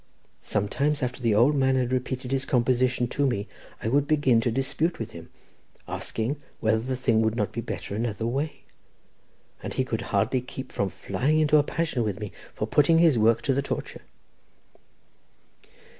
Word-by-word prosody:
Sometimes 140 +8 0
after 125 +1 -3
the 115 -3 +2
old 125 +7 +5
man 130 -1 +3
had 125 -1 0
repeated 130 0 -2
his 135 0 +1
composition 125 -1 +1
to 145 +2 +1
me, 100 -6 -2 0.4
I - - -1
would 140 +4 +2
begin 145 -6 +3
to 120 - 0
dispute 140 +7 -1
with 115 0 -5
him, 85 -4 -11 0.6
asking 130 +6 -3 0.2
whether 110 0 +2
the 130 +3 -3
thing 120 -3 +2
would 110 0 +1
not 105 -5 -1
be 115 - -4
better 105 - -5
another 110 0 -2
way, 140 +6 -2 1.0
and - - -6
he - - +1
could - - -2
hardly 130 - +1
keep 130 +1 -8
from 100 - -1
flying 130 - 0
into 155 0 +4
a - - +6
passion 155 -5 -1
with 105 -3 -2
me 105 -2 -5 0.2
for - - -3
putting 155 +3 +4
his 165 -7 +5
work 115 +2 +3
to 135 - +2
the 140 - +1
torture." 140 - -5
125 Hz, 175 wpm, -26 LUFS, 115-140 Hz, 1.0 s, a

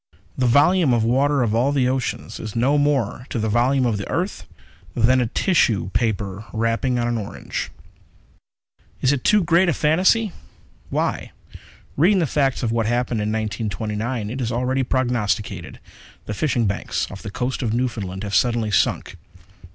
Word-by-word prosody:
The 125 - +1
volume 145 +3 +4
of 115 - +1
water 135 +3 +2
of 110 -3 0
all 125 +5 +2
the 135 -3 +2
oceans 130 -1 -3
is 110 0 -7
no 135 +5 +2
more 135 -4 0
to - - -3
the 110 -1 -1
volume 125 +4 +2
of 110 -4 0
the 100 - -6
earth - - -3 0.5
than 125 +2 +3
a 120 - 0
tissue 115 - +1
paper 105 -3 -1
wrapping 115 +3 0
on 120 0 0
an 120 -1 -1
orange._ 105 -1 -5 1.3
_Is 130 - +4
it 140 -3 -1
too 210 -2 +4
great 170 +2 +3
a - - +2
fantasy? 185 +9 +2 0.6
Why, - - -2 0.6
reading 185 +8 +4
the 175 - +2
facts 135 -2 0
of 115 - 0
what 115 -1 0
happened 120 -1 0
in 105 - -1
1929, 110 +1 -3
it 130 +2 -4
is 115 -2 -1
already 125 +3 0
prognosticated. 120 -6 -1 0.5
The 105 - -4
fishing 120 0 0
banks 100 -1 -1
off 100 - -9
the 110 - -6
Coast 125 +5 -3
of 115 -4 -1
Newfoundland 110 -6 -2
have 100 -1 -5
suddenly 115 -2 +2
sunk. 95 - 0
120 Hz, 165 wpm, -22 LUFS, 110-135 Hz, 1.3 s, volume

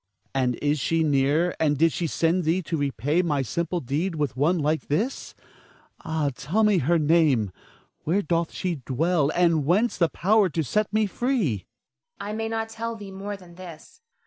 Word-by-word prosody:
Ernest. 135 -1 +1
And 125 -1 +1 0.2
is 150 - 0
she 165 +4 +1
near, 150 +4 +2
and 150 -2 +2
did 165 +2 +3
she 170 - -1
send 165 +4 +1
thee 170 +4 +1
to 165 - -3
repay 145 - 0
my 150 -6 0
simple 170 +7 -2
deed 160 +7 -2
with 145 -6 -2
one 155 +7 +2
like 155 0 -1
this? 215 - -2 0.7
Ah, 155 -3 -1
tell 190 +11 +1
her 175 -5 +3
name! 150 - +3 0.5
Where 190 +6 +1
doth 170 +1 0
she 180 -3 -3
dwell, 155 +3 +1
and 170 -4 +3
whence 200 +11 +1
the 170 -2 +3
power 200 +6 +2
to 160 +1 -1
set 210 - 0
me 215 0 +2
free? 215 - 0 0.6
Zara. 200 +1 -5
I - - -4
may 225 +1 -3
not 225 0 -2
tell 230 +1 -4
thee 205 -3 -9
more 200 +1 -6
than 180 -3 -16
this. 175 - -12
165 Hz, 185 wpm, -25 LUFS, 150-195 Hz, 0.7 s, did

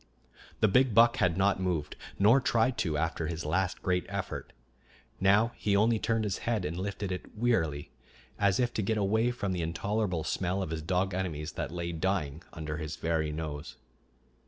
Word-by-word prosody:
The - - +6
big 125 +2 +3
buck 115 +2 +6
had 85 -5 +2
not 95 0 +2
moved, 85 -5 -1 0.2
nor 115 +7 +5
tried 120 0 +2
to, 80 -4 0
after 80 0 -1
his 85 0 -4
last 90 +4 -1
great 90 -1 0
effort. 100 -2 -4 0.7
Now 105 +5 +4
he 100 -1 0
only 110 +2 +3
turned 115 0 0
his 100 -4 -2
head 110 -6 -1
and 80 - -3
lifted 100 +1 -3
it 90 +3 -6
wearily, 80 - 0 0.5
as 100 +1 +3
if 120 -1 +1
to - - -1
get 110 +2 0
away 110 +4 +2
from 100 -6 -2
the 90 -2 -1
intolerable 90 +2 -1
smell 95 +4 -1
of 80 - -5
his 80 -1 -3
dog 90 +3 0
enemies 85 -4 -3
that - - -4
lay 85 0 -4
dying 80 -3 -1
under 75 -1 -5
his 75 -1 -4
very 80 -2 -1
nose. 75 -1 -5
95 Hz, 180 wpm, -30 LUFS, 80-105 Hz, 0.7 s, The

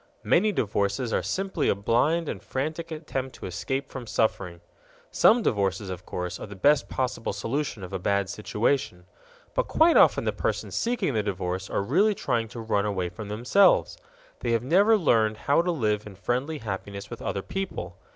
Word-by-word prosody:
Many 210 +5 +3
divorces 105 - -1
are - - +2
simply 195 0 -1
a - - +3
blind 140 +11 +1
and - - -4
frantic 155 +5 -3
attempt 150 -5 -5
to - - -9
escape 130 +9 -3
from 125 -3 -8
suffering. 95 -6 -1 0.5
Some 230 +1 +5
divorces, 100 -1 0
of 90 0 -8
course, 90 0 -4
are - - -7
the 100 - -9
best 145 +9 +3
possible 125 -3 -2
solution 135 -4 -3
of 90 - -8
a 95 - -2
bad 100 +1 +1
situation. 105 -1 -1 0.5
But - - 0
quite 330 +1 +4
often - - +5
the - - 0
persons - - -3
seeking 230 - 0
the 110 - +1
divorce 95 -2 -3
are - - -1
really 195 - +3
trying 120 -8 -1
to 120 +1 -9
run 105 -2 0
away 95 -4 -1
from 100 +4 -8
themselves. 125 - +3 0.4
They 115 - -1
have 115 0 +1
never 200 - +5
learned 110 - +2
how 140 +8 +2
to 175 - -2
live 105 -10 0
in 100 - -10
friendly 125 - -2
happiness 100 -3 -6
with - - -7
other 95 - -3
people. 190 - -5
115 Hz, 180 wpm, -26 LUFS, 100-150 Hz, 0.5 s, Some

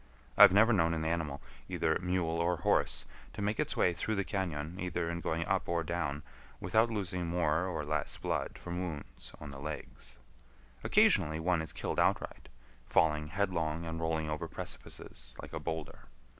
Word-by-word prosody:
I - - +4
have - - +12
never 110 +5 +6
known 85 -4 +3
an 80 0 -2
animal, 80 -4 -2 0.3
either 80 0 +1
mule 90 -2 0
or 85 +1 +1
horse, - - +2 0.3
to - - -6
make 105 +1 0
its - - -1
way 90 - +4
through 110 +5 -2
the 100 -1 0
cañon, 85 -3 -3
either 85 -1 -1
in 85 - -3
going 80 +1 -1
up - - 0
or 85 -1 +1
down, 80 -3 -2 0.4
without 110 +2 +3
losing 90 -5 -2
more 85 0 +1
or 80 -5 -3
less 75 -1 -1
blood - - -2
from 85 0 -5
wounds 75 -9 -6
on 75 -1 -8
the 70 - -9
legs. 75 -5 -7 0.7
Occasionally 80 +1 +4
one 85 0 +1
is 80 - -5
killed - - -3
outright—falling 75 +5 0
headlong 85 -3 -1
and 80 0 -4
rolling 80 -1 0
over 75 -1 -3
precipices - - -9
like - - -9
a - - -2
boulder. 80 -2 -5
85 Hz, 170 wpm, -32 LUFS, 75-90 Hz, 0.7 s, have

